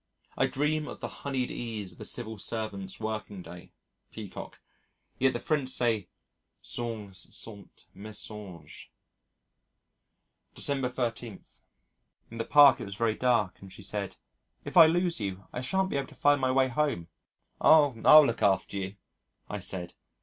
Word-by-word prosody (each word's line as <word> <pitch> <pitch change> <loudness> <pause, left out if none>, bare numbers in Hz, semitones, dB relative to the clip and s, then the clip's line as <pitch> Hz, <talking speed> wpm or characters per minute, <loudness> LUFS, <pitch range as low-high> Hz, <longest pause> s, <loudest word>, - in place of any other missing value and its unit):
I - - +2
dream 150 +2 0
of - - -8
"the - - -4
honeyed 135 -3 -2
ease 110 -5 -5
of 90 - -17
the - - -5
Civil 110 -3 -1
Servant's 100 -3 -4
working 105 -3 -5
day" 90 +1 -12 0.4
(Peacock). 105 -4 -9 0.6
Yet 130 0 +3
the - - -2
French 145 -4 -1
say 115 -7 0 0.5
Songes 105 -6 -6
sont 100 -4 -8
mensonges. 100 -5 -7 1.7
December 135 -3 0
13. 120 -4 -4 0.9
In 115 - -8
the 115 - -1
Park 145 -3 +7
it - - -4
was 100 -1 -7
very 115 0 +1
dark 115 -5 +1
and 95 -1 -12
she - - -10
said, - - -4 0.5
"If - - -7
I 165 -3 +10
lose 175 0 +1
you 95 -2 -4
I 125 - -3
shan't 190 +8 0
be - - 0
able 140 - -2
to - - -16
find 145 -1 +3
my 130 0 +2
way 130 0 +3
home." 125 - -1 0.5
"Oh! 150 -4 +6
I'll 155 -1 +9
look 115 -3 -2
after 100 0 +2
you," 95 +1 -5 0.5
I - - -4
said. 90 -2 -1
115 Hz, 155 wpm, -29 LUFS, 100-135 Hz, 1.7 s, I